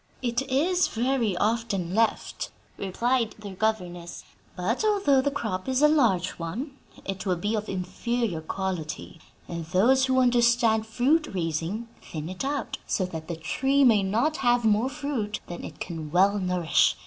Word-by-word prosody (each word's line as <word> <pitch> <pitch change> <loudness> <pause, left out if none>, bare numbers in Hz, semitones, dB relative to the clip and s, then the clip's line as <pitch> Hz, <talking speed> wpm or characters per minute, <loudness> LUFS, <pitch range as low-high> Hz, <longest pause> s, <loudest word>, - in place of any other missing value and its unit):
"It 240 +1 0
is 350 +8 +2
very 235 -5 0
often 210 -4 0
left," 225 +2 0 0.3
replied 230 +4 0
their 205 -2 -8
governess, 180 -4 -2 0.3
"but, 200 - -1
although 395 -11 +3
the 285 - +1
crop 220 -6 -3
is 260 +2 +2
a - - +9
large 230 - +3
one, 230 - -4 0.3
it 195 0 -4
will 185 - +2
be 205 +6 -2
of 215 -1 -2
inferior 190 +1 -2
quality; 170 -2 -4 0.3
and 170 -1 -5
those 235 +11 +4
who 260 0 +3
understand 235 -3 +3
fruit 280 +8 +2
raising 170 +6 -2
thin 155 0 -6
it 185 +5 -5
out, 285 +1 -2
so 185 - 0
that 160 -3 -7
the 170 - -3
tree 270 - +1
may 225 -6 +6
not 230 +11 +1
have 240 -2 +2
more 220 +4 +3
fruit 275 -8 -3
than 175 - -7
it - - -9
can 160 -4 -5
well 195 +5 +3
nourish. 180 -3 +2
220 Hz, 160 wpm, -26 LUFS, 180-255 Hz, 0.3 s, a